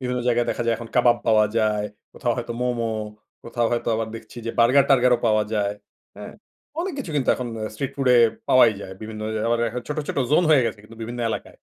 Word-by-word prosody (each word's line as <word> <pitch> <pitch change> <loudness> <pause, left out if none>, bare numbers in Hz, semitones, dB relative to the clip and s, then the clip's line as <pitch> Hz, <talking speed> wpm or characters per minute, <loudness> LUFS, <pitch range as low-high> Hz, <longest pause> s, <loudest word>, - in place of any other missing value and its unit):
বিভিন্ন 125 -1 -2
জায়গায় 120 0 +2
দেখা - - -2
যায় 115 - +3
এখন 115 0 -9
কাবাব 120 -1 +5
পাওয়া 110 -1 +5
যায়। 105 -1 +1 0.3
কোথাও 120 - -1
হয়তো 120 -1 -4
মোমো, 120 -2 -1 0.5
কোথাও 115 0 -1
হয়তো 120 - -1
আবার 110 0 -2
দেখছি 110 +1 -11
যে - - 0
বার্গার-টার্গারও 125 0 +5
পাওয়া 110 -1 +3
যায়। 105 -1 0 0.4
হ্যাঁ? - - -9 0.5
অনেক 370 +2 -3
কিছু 250 -11 -5
কিন্তু 135 - -1
এখন 125 -1 -5
অ - - -4
স্ট্রিট 130 +4 -3
ফুড 135 -2 -2
এ - - +6 0.3
পাওয়াই 120 -3 +6
যায়। 95 - -8
বিভিন্ন 110 0 -7
ওই - - -3
আবার 120 0 +1
এ্যা 120 +1 -2
ছোট, 150 - -3
ছোট, - - -2
জোন 155 +4 +4
হয়ে 145 -4 +6
গেছে 110 -2 -4
কিন্তু 115 +2 -14
বিভিন্ন 120 +2 -5
এলাকায়। - - -6
120 Hz, 215 wpm, -23 LUFS, 110-125 Hz, 0.5 s, এ